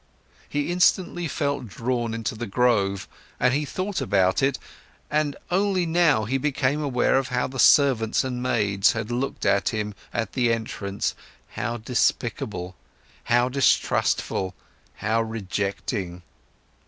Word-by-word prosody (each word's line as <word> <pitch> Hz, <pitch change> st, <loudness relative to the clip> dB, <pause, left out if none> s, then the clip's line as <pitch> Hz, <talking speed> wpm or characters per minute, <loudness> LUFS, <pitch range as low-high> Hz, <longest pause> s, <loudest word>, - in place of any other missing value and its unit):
He 145 Hz, +3 st, -1 dB
instantly 175 Hz, -1 st, +2 dB
felt 140 Hz, -4 st, -2 dB
drawn 115 Hz, +2 st, -2 dB
into 115 Hz, -2 st, -3 dB
the 115 Hz, +1 st, -5 dB
grove, 100 Hz, -3 st, +1 dB, 0.3 s
but 125 Hz, 0 st, +2 dB
he 145 Hz, +2 st, 0 dB
thought 185 Hz, +4 st, -3 dB
about 95 Hz, -7 st, +2 dB
it, 135 Hz, -1 st, +2 dB, 0.5 s
and 150 Hz, -1 st, +1 dB, 0.2 s
only 190 Hz, -1 st, +2 dB
now 160 Hz, -9 st, +3 dB
he 135 Hz, +5 st, 0 dB
became 145 Hz, +1 st, 0 dB
aware 135 Hz, -2 st, +2 dB
of 135 Hz, -, -3 dB
how 125 Hz, 0 st, 0 dB
the 130 Hz, 0 st, -6 dB
servants 125 Hz, -7 st, +4 dB
and 125 Hz, -2 st, -3 dB
maids 105 Hz, -6 st, +2 dB
had 110 Hz, +1 st, -4 dB
looked 125 Hz, +3 st, -2 dB
at 100 Hz, -, +3 dB
him 105 Hz, -1 st, -3 dB, 0.2 s
at 115 Hz, -3 st, -3 dB
the 120 Hz, -3 st, +2 dB
entrance, 105 Hz, -3 st, -2 dB, 0.4 s
how 120 Hz, 0 st, -3 dB
despicable, 110 Hz, -6 st, -1 dB, 0.5 s
how 120 Hz, +1 st, +3 dB
distrustful, 125 Hz, -7 st, +1 dB, 0.4 s
how 110 Hz, +2 st, 0 dB
rejecting. 100 Hz, -3 st, -3 dB
120 Hz, 130 wpm, -24 LUFS, 105-140 Hz, 0.5 s, servants